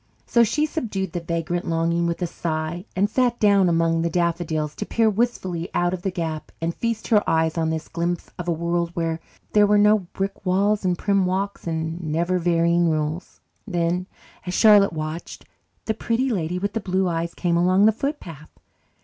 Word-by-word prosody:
So 235 - +4
she 300 +7 +1
subdued 210 - -3
the 175 - -1
vagrant 170 +1 -3
longing 170 +1 +1
with 170 +2 -2
a - - +2
sigh 165 +1 -3
and 195 +2 +2
sat 240 +2 +1
down 200 -3 +4
among 165 0 +2
the 170 - 0
daffodils 165 -3 -1
to 210 - -3
peer 225 -1 +2
wistfully 190 -6 -1
out 175 0 +1
of 185 - -4
the 195 - -1
gap 160 -4 -4
and 165 +1 -2
feast 230 +1 -3
her 210 -2 +4
eyes 160 0 +2
on 160 -1 0
this 160 0 -3
glimpse 170 +1 -3
of 180 - -5
a - - +2
world 170 +1 -1
where 165 -1 -1 0.3
there 210 -1 +5
were 210 0 +4
no 210 +1 +5
brick 195 +2 -5
walls 200 +3 +1
and 180 -2 +1
prim 195 -1 +1
walks 195 0 -2
and 160 +1 -3
never 170 +3 0
varying 170 0 +2
rules. 155 +2 -3 0.3
Then, 175 -1 -1 0.4
as 180 0 -4
Charlotte 205 -4 +6
watched, 155 +1 -6 0.4
the 220 - 0
Pretty 235 +4 -1
Lady 180 -4 -1
with 200 +2 -2
the 225 - -1
Blue 190 -1 0
Eyes 170 0 -2
came 175 -2 0
along 185 +3 +4
the 220 - +6
footpath. 205 - -5
175 Hz, 190 wpm, -23 LUFS, 165-200 Hz, 0.4 s, Charlotte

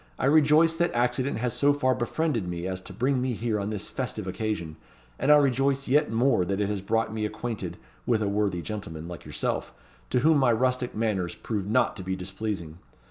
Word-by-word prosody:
I - - -1
rejoice 155 +3 +5
that 175 0 +2
accident 125 +3 +1
has 120 0 -1
so 145 0 +3
far 130 -2 +2
befriended 120 - -1
me 85 0 -4
as 95 0 -3
to - - -11
bring 130 +1 0
me 130 -1 0
here 110 -1 -1
on 100 +1 -2
this 105 -2 -3
festive 125 -6 -4
occasion; 95 -5 -3 0.4
and 135 +4 +3
I 150 - +9
rejoice 135 0 +2
yet 140 -1 +3
more 115 -3 +3
that 100 +3 -2
it 100 -1 0
has 105 -2 -2
brought 115 +3 0
me 110 -1 -2
acquainted 115 +1 -4 0.3
with 110 -3 +2
a - - 0
worthy 100 -4 0
gentleman 85 -7 -6
like 85 -2 -8
yourself, - - -2 0.4
to 125 - +2
whom 155 +1 +5
my 125 -3 +4
rustic 125 +1 0
manners 105 -5 -1
prove 105 -4 -3
not 120 +3 +2
to 95 - -6
be 95 +1 -2
displeasing. 95 -3 -5
115 Hz, 205 wpm, -27 LUFS, 100-130 Hz, 0.4 s, I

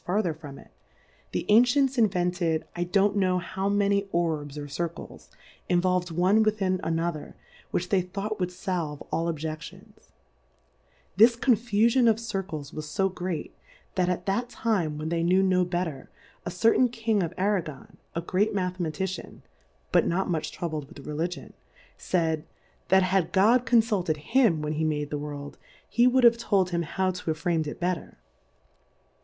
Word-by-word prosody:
17 180 - 0
farther 170 -4 -1
from 145 -3 -10
it; - - -16 0.6
the - - -2
Ancients 250 +5 +4
invented 180 -7 +1
I 175 0 -1
don't 200 +3 +2
know 185 -2 +2
how 190 +2 -2
many 200 0 +1
Orbs 155 -4 -1
or 145 0 -5
Cir« 170 +4 -2
cles, 170 - -12 0.4
involved 180 0 +2
one 180 +6 +3
within 200 -4 +1
another, 165 -1 -2 0.3
which 180 +1 -2
they 195 -2 +3
thought 200 +4 -5
would 180 -1 -1
falve 175 -5 -3
all 165 +1 0
Objedions; 155 0 -8 1.1
this 230 +3 +7
Confufion 235 0 +3
of 220 0 +2
Circles 190 -10 -5
was 150 -1 -6
fo 195 0 +2
great, 180 -4 -5 0.4
that 180 -1 +1
at 180 0 -2
that 235 +5 -1
Time 195 -11 -1
when 155 +1 -4
they 170 0 0
knew 185 +3 +3
no 185 -1 +3
better, 175 -6 -3 0.4
a - - 0
certain 230 +6 +3
King 225 -3 0
ofjrago^^^ 180 -4 -2 0.2
a 170 - -1
great 190 +5 0
Mathematician, 180 -1 -3 0.5
("but - - +4
not 190 +3 0
much 160 -3 -2
troubled 155 -4 -4
with 140 - -12
Religion,; 165 +4 -4 0.4
faid, 160 -4 -1 0.4
That 190 0 +5
had 185 -2 +1
God 230 +6 +4
con 235 -1 +6
[tilted 190 -8 -1
him 185 - +2
when 150 0 -2
he 155 +1 -1
made 150 -2 -1
the 145 - -2
Worlds 145 -1 -7 0.3
he 240 +2 +3
would 255 0 +3
have 235 -1 +7
told 195 -5 +1
him 170 0 0
how 185 +3 -1
to 180 - -8
have 155 0 -2
fram'^d 170 -3 +1
ithetter. 175 +3 -3
180 Hz, 160 wpm, -27 LUFS, 160-205 Hz, 1.1 s, this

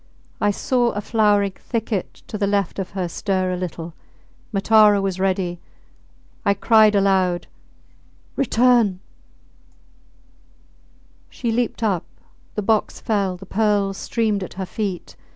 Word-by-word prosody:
I 205 - +3
saw 240 +3 +1
a 205 - -3
flowering 205 -2 +2
thicket 220 -1 -4
to - - -8
the 205 -1 0
left 200 -2 0
of 190 - -3
her 180 -2 -1
stir 185 +1 -1
a - - -1
little... 175 -2 -5 0.6
Matara 210 0 +5
was 195 -2 -2
ready... 185 -2 -1 0.8
I 200 -1 +2
cried 215 -1 +5
aloud 190 -3 +2 0.9
Return! 235 -6 +3 2.3
She 235 -3 -3
leaped 235 0 -1
up; 195 -6 0 0.5
the 210 - -2
box 215 +1 0
fell; 200 -4 -1
the 195 - -11
pearls 200 -1 +1
streamed 220 -4 -1
at 185 - -9
her 190 0 -4
feet. 195 -3 -4
200 Hz, 125 wpm, -21 LUFS, 190-220 Hz, 2.3 s, Matara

